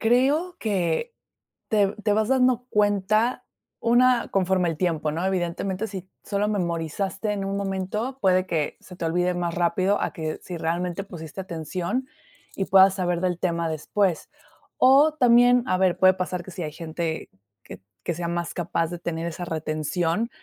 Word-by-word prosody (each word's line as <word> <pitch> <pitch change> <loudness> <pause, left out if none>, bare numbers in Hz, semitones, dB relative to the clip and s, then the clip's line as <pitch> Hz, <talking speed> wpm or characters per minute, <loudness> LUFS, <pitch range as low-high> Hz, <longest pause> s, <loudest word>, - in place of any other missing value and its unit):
Creo 275 +10 +2
que 200 - -1 0.6
te 205 -2 +2
te 210 -2 +2
vas 215 0 +1
dando 250 -1 +2
cuenta 210 +3 +1 0.3
una 245 +1 +3
conforme 185 -2 +2
al 160 - -4
tiempo, 160 -4 0
¿no?, 165 +4 -2
evidentemente, 190 +3 -1
si 190 -2 -8
solo 205 0 -1
memorizaste 190 +2 -2
en 200 -1 -3
un 195 0 -2
momento, 200 +6 -3
puede 185 -1 +3
que 160 -5 -2
se 180 - -13
te 170 - -7
olvide 180 +2 +1
más 175 -1 -2
rápido, 185 +3 +1
a - - -2
que 160 -4 -4
si 180 - -6
realmente 175 +3 -2
pusiste 170 -2 -8
atención 180 - -3 0.5
y 195 - -1
puedas 190 0 +6
saber 180 -3 -1
del 180 -1 -1
tema 170 -2 0
después, 165 +3 -1 0.5
o 280 +4 +6
también, 245 -2 +5
a 185 - +2
ver, 185 -1 +2
puede 185 0 +6
pasar 180 -1 -3
que 185 - -9
si 175 0 -5
hay 155 - -4
gente 160 0 -4 0.3
que - - -11 0.2
que 170 - -1
sea 170 +1 -4
más 170 0 -3
capaz 170 -1 -1
de 175 0 -6
tener 170 -1 -3
esa 170 +1 -5
retención 160 +6 -1
185 Hz, 165 wpm, -25 LUFS, 170-210 Hz, 0.6 s, puedas